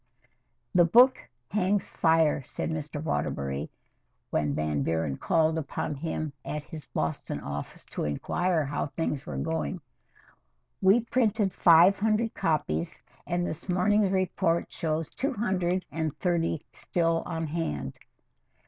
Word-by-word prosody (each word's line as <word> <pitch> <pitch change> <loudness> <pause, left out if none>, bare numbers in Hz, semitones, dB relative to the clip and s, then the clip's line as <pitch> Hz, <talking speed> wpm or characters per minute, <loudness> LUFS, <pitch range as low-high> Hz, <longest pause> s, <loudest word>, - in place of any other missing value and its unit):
"The 175 -2 +6
book 245 +9 +6 0.3
hangs 200 +1 +1
fire," 160 -3 +3
said 135 - -4
Mr. 150 -2 -4
Waterbury 70 - -2 0.6
when 75 -2 0
Van 75 -1 0
Buren 80 -1 0
called 160 - +2
upon 150 0 -3
him 155 0 -3
at 150 -1 -4
his 155 -2 -9
Boston 80 0 -3
office 70 0 -6
to - - -2
inquire 160 - 0
how 145 +2 -2
things 150 -2 -3
were 70 - -4
going. 75 +1 -2 1.0
"We 195 +5 +5
printed 220 -4 +1
five 175 +3 +6
hundred 220 +2 +1
copies, 85 - -1 0.3
and 175 0 0
this 170 +2 -6
morning's 200 +3 +3
report 185 -2 0
shows 160 0 -1
two 275 +2 -2
hundred 185 -5 0
and 155 0 -2
thirty 165 -4 0
still 165 -1 0
on 165 0 -2
hand. 145 - -3
165 Hz, 130 wpm, -28 LUFS, 140-185 Hz, 1.0 s, The